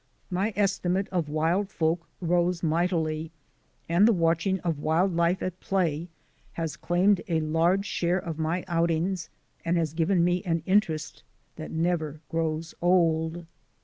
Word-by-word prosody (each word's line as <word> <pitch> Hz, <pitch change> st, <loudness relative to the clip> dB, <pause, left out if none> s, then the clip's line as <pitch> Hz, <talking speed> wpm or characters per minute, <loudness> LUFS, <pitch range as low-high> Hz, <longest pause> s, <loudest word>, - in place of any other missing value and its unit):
My 190 Hz, +5 st, 0 dB
estimate 195 Hz, -1 st, +1 dB
of 170 Hz, -5 st, -1 dB
wild 165 Hz, +6 st, +1 dB
folk 165 Hz, -1 st, -1 dB
rose 175 Hz, 0 st, +1 dB
mightily 160 Hz, -1 st, 0 dB, 0.6 s
and 175 Hz, +6 st, +5 dB
the -, -, +6 dB
watching 170 Hz, +1 st, +1 dB
of 165 Hz, -4 st, -2 dB
wild 165 Hz, +5 st, +1 dB
life 170 Hz, +2 st, +1 dB
at 185 Hz, 0 st, -4 dB
play 170 Hz, -4 st, -1 dB, 0.5 s
has 165 Hz, -2 st, -3 dB
claimed 180 Hz, +2 st, +2 dB
a 165 Hz, -3 st, +1 dB
large 165 Hz, +5 st, +2 dB
share 175 Hz, -2 st, 0 dB
of 170 Hz, -4 st, -5 dB
my 165 Hz, +3 st, -1 dB
outings 170 Hz, +1 st, 0 dB, 0.3 s
and 170 Hz, +1 st, +1 dB
has 160 Hz, -3 st, 0 dB
given 170 Hz, +2 st, +2 dB
me 175 Hz, +1 st, +2 dB
an 165 Hz, -2 st, -1 dB
interest 165 Hz, -6 st, 0 dB, 0.4 s
that 155 Hz, -, -6 dB
never 160 Hz, -2 st, -1 dB
grows 160 Hz, 0 st, -2 dB
old. 170 Hz, -1 st, +2 dB
170 Hz, 145 wpm, -27 LUFS, 160-180 Hz, 0.6 s, the